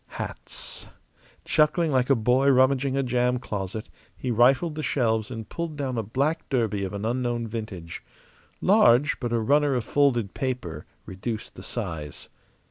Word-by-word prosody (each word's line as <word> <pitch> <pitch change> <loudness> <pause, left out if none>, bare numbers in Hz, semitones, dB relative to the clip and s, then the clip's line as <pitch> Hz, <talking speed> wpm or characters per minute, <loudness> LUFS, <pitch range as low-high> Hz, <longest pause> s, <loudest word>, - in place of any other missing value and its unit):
Hats. - - -7 0.6
Chuckling 155 +1 +2
like 130 -1 +2
a 135 - +6
boy 125 +4 +3
rummaging 135 +1 +3
a 135 - +2
jam 125 0 +1
closet, 105 -2 -5 0.3
he 125 - -2
rifled 130 +8 +4
the 155 - -4
shelves 115 -7 0
and 115 -4 -6
pulled 165 +1 -5
down 135 -3 -2
a 115 - 0
black 135 - -1
derby 110 -7 0
of 95 - -4
an 100 +1 -4
unknown 120 0 -1
vintage. 105 -7 -6 0.6
Large; 125 +6 +4
but 120 -2 -3
a 120 - +2
runner 145 +4 +3
of 120 - 0
folded 120 -7 +1
paper 110 - -4 0.2
reduced 110 +4 -5
the - - -11
size. 80 -10 -5
125 Hz, 155 wpm, -26 LUFS, 110-135 Hz, 0.6 s, a